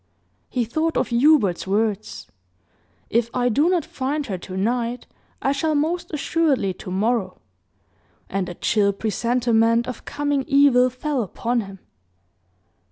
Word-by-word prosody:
He 245 Hz, -2 st, -1 dB
thought 315 Hz, +8 st, -1 dB
of -, -, 0 dB
Hubert's 235 Hz, -, +3 dB
words, 210 Hz, +1 st, -1 dB, 0.9 s
"If 235 Hz, 0 st, +1 dB
I 245 Hz, -1 st, +2 dB
do 290 Hz, +8 st, +3 dB
not 355 Hz, -4 st, +1 dB
find 285 Hz, +3 st, -3 dB
her 195 Hz, -6 st, -4 dB
tonight, 230 Hz, +7 st, -2 dB, 0.4 s
I 270 Hz, -, +2 dB
shall 305 Hz, +3 st, 0 dB
most 335 Hz, +4 st, -1 dB
assuredly 295 Hz, -, +1 dB
to 180 Hz, -, -10 dB
morrow," 195 Hz, 0 st, -1 dB, 0.9 s
and 190 Hz, -1 st, -2 dB
a 175 Hz, -, -7 dB
chill 200 Hz, 0 st, +1 dB
presentiment 230 Hz, +2 st, +1 dB
of 250 Hz, -, -6 dB
coming 290 Hz, -2 st, -1 dB
evil 275 Hz, -3 st, +5 dB
fell 260 Hz, +2 st, -2 dB
upon 235 Hz, +4 st, -2 dB
him. 195 Hz, -2 st, -9 dB
240 Hz, 130 wpm, -22 LUFS, 210-285 Hz, 0.9 s, evil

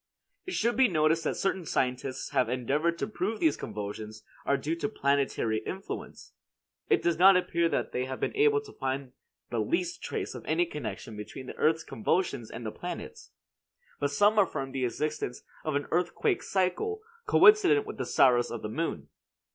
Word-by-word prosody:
It 370 Hz, -, -3 dB
should 235 Hz, +2 st, +1 dB
be 260 Hz, 0 st, +5 dB
noticed 160 Hz, -2 st, +2 dB
that -, -, 0 dB
certain 190 Hz, -1 st, -1 dB
scientists 130 Hz, -3 st, -2 dB
have 125 Hz, -, +2 dB
endeavored 145 Hz, +7 st, 0 dB
to -, -, -2 dB
prove 215 Hz, +1 st, -2 dB
these 320 Hz, -, +3 dB
convulsions 105 Hz, +1 st, -6 dB, 0.2 s
are 140 Hz, -, +3 dB
due 150 Hz, +4 st, -2 dB
to 170 Hz, -, -2 dB
planetary 140 Hz, -, +1 dB
influence. 190 Hz, -, -7 dB, 0.6 s
It 410 Hz, -, +3 dB
does 170 Hz, -1 st, +1 dB
not 190 Hz, +1 st, +8 dB
appear 170 Hz, -2 st, +1 dB
that -, -, -1 dB
they 125 Hz, -, -1 dB
have 130 Hz, 0 st, -5 dB
been -, -, -2 dB
able 430 Hz, 0 st, +4 dB
to 430 Hz, -, -13 dB
find 135 Hz, -1 st, -3 dB, 0.4 s
the 120 Hz, -, 0 dB
least 170 Hz, -, -1 dB
trace -, -, -4 dB
of -, -, -8 dB
any 165 Hz, +3 st, +2 dB
connection 140 Hz, -7 st, -6 dB
between 105 Hz, +5 st, -8 dB
the -, -, -8 dB
earth's 160 Hz, +1 st, +2 dB
convulsions 180 Hz, -, -1 dB
and 115 Hz, 0 st, -7 dB
the 110 Hz, -, -3 dB
planets; 445 Hz, -, -7 dB, 0.7 s
but 145 Hz, -, +1 dB
some 205 Hz, +9 st, +4 dB
affirm 140 Hz, -9 st, 0 dB
the 130 Hz, -1 st, -1 dB
existence 150 Hz, 0 st, -3 dB, 0.2 s
of 155 Hz, -2 st, -1 dB
an 145 Hz, -, 0 dB
earthquake 180 Hz, -, +1 dB
cycle 195 Hz, -, -1 dB, 0.3 s
coincident 425 Hz, 0 st, +6 dB
with 430 Hz, -, -7 dB
the -, -, -1 dB
Saros 120 Hz, -2 st, +4 dB
of 120 Hz, -, -6 dB
the 105 Hz, -, -3 dB
moon. 110 Hz, -, -3 dB
155 Hz, 180 wpm, -29 LUFS, 130-195 Hz, 0.7 s, not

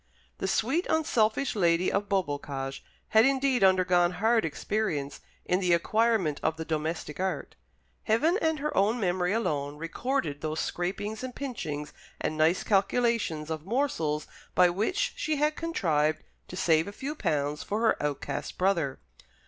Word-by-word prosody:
The -, -, -1 dB
sweet 260 Hz, -, +1 dB
unselfish 270 Hz, -5 st, +1 dB
lady 175 Hz, -2 st, +2 dB
of 200 Hz, 0 st, -1 dB
Beaubocage 145 Hz, -7 st, -2 dB, 0.3 s
had 220 Hz, 0 st, +6 dB
indeed 270 Hz, -3 st, +2 dB
undergone 180 Hz, -2 st, +4 dB
hard 220 Hz, +4 st, +2 dB
experience 160 Hz, -4 st, -2 dB, 0.2 s
in 180 Hz, -, +1 dB
the 180 Hz, -2 st, +2 dB
acquirement 210 Hz, -3 st, +2 dB
of 160 Hz, 0 st, 0 dB
the 160 Hz, -, -5 dB
domestic 155 Hz, 0 st, -3 dB
art. 185 Hz, -6 st, -2 dB, 0.5 s
Heaven 315 Hz, -, +3 dB
and 320 Hz, -1 st, +1 dB
her 300 Hz, +1 st, -3 dB
own 210 Hz, +5 st, +2 dB
memory 180 Hz, -2 st, 0 dB
alone 145 Hz, -10 st, -1 dB
recorded 165 Hz, -, -2 dB
those 155 Hz, 0 st, -2 dB
scrapings 205 Hz, +6 st, -3 dB
and 255 Hz, -1 st, -6 dB
pinchings 155 Hz, -, -5 dB, 0.3 s
and 155 Hz, -, -2 dB
nice 160 Hz, +3 st, +2 dB
calculations 200 Hz, -6 st, +1 dB
of 155 Hz, -1 st, -4 dB
morsels 165 Hz, -, 0 dB, 0.3 s
by 180 Hz, -1 st, +6 dB
which 225 Hz, -, 0 dB
she 310 Hz, -, 0 dB
had 300 Hz, +1 st, +1 dB
contrived 155 Hz, -, 0 dB, 0.2 s
to -, -, -8 dB
save 165 Hz, -3 st, +2 dB
a -, -, -5 dB
few 275 Hz, +7 st, -5 dB
pounds 150 Hz, -, -1 dB
for 210 Hz, +2 st, -2 dB
her 225 Hz, -, +2 dB
outcast 145 Hz, -1 st, -3 dB
brother. 170 Hz, -8 st, +1 dB
185 Hz, 150 wpm, -28 LUFS, 155-230 Hz, 0.5 s, had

